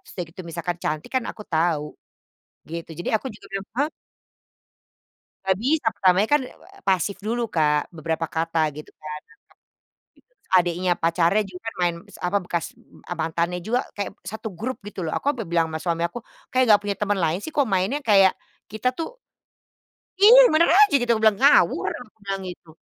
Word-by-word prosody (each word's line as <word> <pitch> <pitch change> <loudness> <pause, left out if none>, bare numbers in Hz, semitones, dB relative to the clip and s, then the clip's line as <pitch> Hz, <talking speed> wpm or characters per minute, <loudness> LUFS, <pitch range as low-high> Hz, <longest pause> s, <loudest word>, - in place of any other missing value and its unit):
terus - - -15
udah 180 - -2
gitu 180 - -10
misalkan 170 +1 -3
cantik 155 +1 -3
kan 255 - 0
aku 210 - -10
tahu, 160 -2 +2 0.9
gitu. 170 0 -6
Jadi, 175 - -4
aku 215 - -7
juga - - -15
bilang, 195 0 -4
"Ha?" 285 - +4 1.6
Nggak 190 -1 +1
bisa, 275 +2 +1
pertamanya 190 +2 +3
kan, 295 - +4
e 255 - -6
ew - - -19
pasif 190 +1 +1
dulu 235 +4 -2
Kak. 150 -1 +1
Beberapa 165 0 -3
kata 165 0 0
gitu 150 +2 -10
kan, 150 0 -7 1.1
terus - - -40
adiknya 175 +1 +1
pacarnya 170 +5 +2
juga 190 +4 -11
main, 175 -2 +1
se - - -14
apa 180 +3 0
bekas 170 -2 -2 0.6
mantannya 170 +2 -1
juga 240 +7 -1
kayak, 200 -1 -3 0.2
1 220 +1 -5
grup 255 +2 -4
gitu 195 -3 -6
loh. 160 - -3
Aku 285 - 0
sampai 235 -8 -2
bilang 165 -1 +1
sama 160 - -3
suami 170 -1 0
aku, 170 +6 -2 0.3
"Kayak 255 0 +3
nggak 205 - +6
punya 205 -1 -2
teman 205 -1 0
lain 165 +2 +1
sih?" 315 - -7
Kok 285 -3 +2
mainnya 195 +9 +1
kayak 195 -5 +5 0.3
kita 220 +4 -1
tuh - - -6 1.0
Iya! 485 +5 +9
Yang - - +1
benar 335 +2 +5
aja 420 -4 +7
gitu, 245 - -2
aku 220 - -3
bilang 215 -2 +4
"ngawur" 280 +2 +5
aku 245 -3 -8
bilang 195 -1 -3
gitu. 175 -2 -9
190 Hz, 185 wpm, -23 LUFS, 170-225 Hz, 1.6 s, Iya